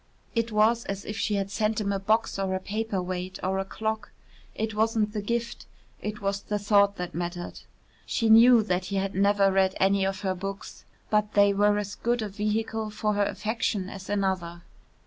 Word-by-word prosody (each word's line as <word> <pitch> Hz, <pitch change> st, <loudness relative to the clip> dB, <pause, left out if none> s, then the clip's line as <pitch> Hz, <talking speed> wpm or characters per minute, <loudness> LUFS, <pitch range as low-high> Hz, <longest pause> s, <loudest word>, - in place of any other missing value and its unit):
It 230 Hz, -1 st, 0 dB
was 220 Hz, +2 st, +3 dB
as 195 Hz, 0 st, -5 dB
if 210 Hz, -, -5 dB
she 215 Hz, -1 st, 0 dB
had 195 Hz, 0 st, -2 dB
sent 215 Hz, +1 st, 0 dB
him 200 Hz, -2 st, -1 dB
a 195 Hz, -, -1 dB
box 215 Hz, +1 st, +1 dB
or 190 Hz, -1 st, 0 dB
a -, -, -1 dB
paper 210 Hz, +1 st, -3 dB
weight 185 Hz, +1 st, -4 dB
or 190 Hz, +1 st, 0 dB
a -, -, 0 dB
clock. 220 Hz, +1 st, -3 dB, 0.5 s
It 220 Hz, 0 st, -2 dB
wasn't 215 Hz, 0 st, +1 dB
the 210 Hz, -, -2 dB
gift, 235 Hz, +3 st, -3 dB, 0.3 s
it 210 Hz, 0 st, -5 dB
was 200 Hz, 0 st, -1 dB
the 210 Hz, -, -2 dB
thought 200 Hz, -1 st, +3 dB
that 180 Hz, -2 st, -5 dB
mattered. 175 Hz, +1 st, -5 dB, 0.5 s
She 230 Hz, -, 0 dB
knew 230 Hz, +1 st, +7 dB
that 185 Hz, -2 st, -1 dB
he 200 Hz, -, -4 dB
had 195 Hz, 0 st, -1 dB
never 200 Hz, 0 st, +3 dB
read 190 Hz, 0 st, +2 dB
any 195 Hz, 0 st, +3 dB
of 195 Hz, 0 st, -2 dB
her 190 Hz, -2 st, 0 dB
books, 195 Hz, +2 st, -7 dB, 0.3 s
but 210 Hz, 0 st, +1 dB
they 200 Hz, 0 st, +5 dB
were 205 Hz, +1 st, +3 dB
as 205 Hz, -1 st, -3 dB
good 240 Hz, -1 st, -1 dB
a 210 Hz, -, -4 dB
vehicle 215 Hz, +2 st, -2 dB
for 210 Hz, 0 st, -1 dB
her 205 Hz, 0 st, +2 dB
affection 210 Hz, -3 st, -2 dB
as 195 Hz, -1 st, -9 dB
another. 185 Hz, -4 st, -1 dB
205 Hz, 200 wpm, -27 LUFS, 195-215 Hz, 0.5 s, knew